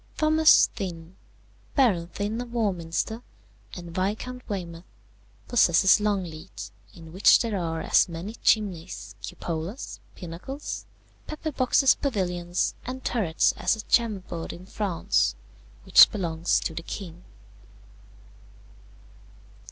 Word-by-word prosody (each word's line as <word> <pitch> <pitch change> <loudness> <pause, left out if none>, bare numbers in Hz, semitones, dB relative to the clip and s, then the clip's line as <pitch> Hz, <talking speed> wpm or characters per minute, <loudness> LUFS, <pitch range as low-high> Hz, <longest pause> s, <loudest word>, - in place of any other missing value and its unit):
"Thomas 310 0 +6
Thynne, 175 -4 -6 0.6
Baron 205 - +3
Thynne 205 +6 -3
of 245 -1 -8
Warminster, 205 0 -2 0.6
and 175 -1 -9
Viscount 215 +7 -3
Weymouth, 175 -4 -5 0.6
possesses 190 -5 +5
Longleat, 190 -5 -4 0.2
in 165 -2 -12
which 190 +3 +6
there 225 -3 -2
are 165 -3 -2
as - - +3
many 170 +6 -6
chimneys, 190 -5 0
cupolas, 170 - -5 0.2
pinnacles, 185 - -7 0.4
pepper 310 0 -4
boxes 260 0 +4
pavilions, 180 -8 -1
and 260 +1 -7
turrets 185 -10 +2
as - - +1
at 220 - -9
Chambord, 195 -8 0
in 180 - -11
France, 190 - 0 0.5
which - - +8
belongs 170 -4 0
to 165 - -3
the 165 - -5
king. 175 0 -8
190 Hz, 105 wpm, -26 LUFS, 170-225 Hz, 0.6 s, which